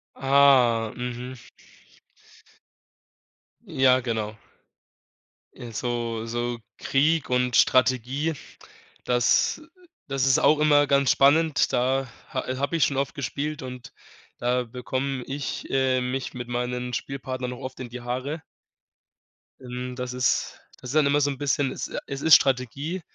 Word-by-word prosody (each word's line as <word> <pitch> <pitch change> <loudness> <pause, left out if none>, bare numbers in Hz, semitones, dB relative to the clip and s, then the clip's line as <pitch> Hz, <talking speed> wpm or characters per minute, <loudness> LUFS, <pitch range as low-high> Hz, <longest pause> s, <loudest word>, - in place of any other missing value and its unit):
Ah, 130 -5 +4
mhm. 125 +1 -5 2.3
Ja, 130 -7 +3
genau. 110 -3 -3 1.2
Äh, 120 -1 -9
so 115 0 -3
so 120 0 -3 0.2
Krieg 155 +2 +1
und 125 -1 +1
Strategie, 130 +4 +2 0.7
das 120 - +2 0.5
das 135 -1 0
ist 130 - +4
auch 150 - +4
immer 145 -1 +4
ganz 140 -1 +3
spannend. 150 +2 +3
Da 130 +2 +1 0.3
ha - - -2
habe 140 +4 -1
ich 165 - +3
schon 140 - -2
oft 140 +3 -2
gespielt 145 +2 -4
und 125 -1 -9 0.4
da 125 +1 0
bekomme 130 +2 -4
ich, 140 +1 -5
äh, 130 -1 +2
mich 125 +1 -3
mit 125 -1 -6
meinen 125 0 -3
Spielpartnern 130 0 -4
auch 125 - -10
oft 130 0 -8
in 125 - -6
die 125 +1 -8
Haare. 130 +6 -4 1.2
Hm, 125 0 -6
das 125 -1 -5
ist 125 -1 0 0.2
das 125 - -9
ist 150 - -5
dann 155 - +5
immer 145 +1 +3
so 145 - +2
'n 140 - -4
bisschen 140 -1 0
es - - -5
äh, - - -5
es 140 0 -5
ist 160 0 +8
Strategie, 140 +7 0
130 Hz, 135 wpm, -25 LUFS, 125-140 Hz, 2.3 s, ist